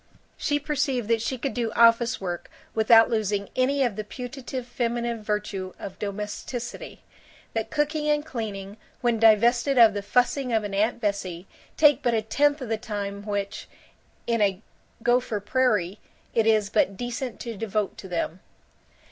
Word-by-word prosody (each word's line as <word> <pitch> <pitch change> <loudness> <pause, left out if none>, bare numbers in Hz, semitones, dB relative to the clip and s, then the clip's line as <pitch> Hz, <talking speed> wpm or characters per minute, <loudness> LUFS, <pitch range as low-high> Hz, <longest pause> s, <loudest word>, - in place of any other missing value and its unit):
She 290 - 0
perceived 280 -5 -1
that 230 -1 +2
she 260 +3 -2
could 270 +3 -3
do 235 -3 -1
office 230 +1 +4
work 175 -3 -5 0.2
without 225 +1 +6
losing 205 -3 0
any 270 +2 +2
of 240 -5 0
the 215 - -4
putative 250 +2 -6
feminine 235 -1 -2
virtue 210 -3 -3
of 190 - -8
domesticity; 210 +4 -5 0.5
that 225 -1 -2
cooking 300 0 0
and 295 0 +1
cleaning, 205 -6 -5 0.2
when 240 -3 +1
divested 235 +5 +4
of 225 -3 +8
the 205 - -3
fussing 250 +4 +1
of 220 -1 +2
an 205 -1 -5
Aunt 215 +4 +1
Bessie, 190 -4 -2 0.3
take 295 -3 +5
but 240 -2 +1
a 220 - 0
tenth 290 +6 +2
of 250 - -5
the 225 - 0
time 205 -2 -5
which, 200 -1 -3 0.6
in 230 -2 0
a 200 0 +1 0.4
Gopher 240 -3 +2
Prairie, 210 -4 +1 0.3
it 225 -1 +2
is 215 -2 +3
but 200 -3 +2
decent 245 0 -4
to 235 -2 -5
devote 210 -1 -2
to 190 - -8
them. 175 -1 -3
225 Hz, 160 wpm, -25 LUFS, 205-250 Hz, 0.6 s, of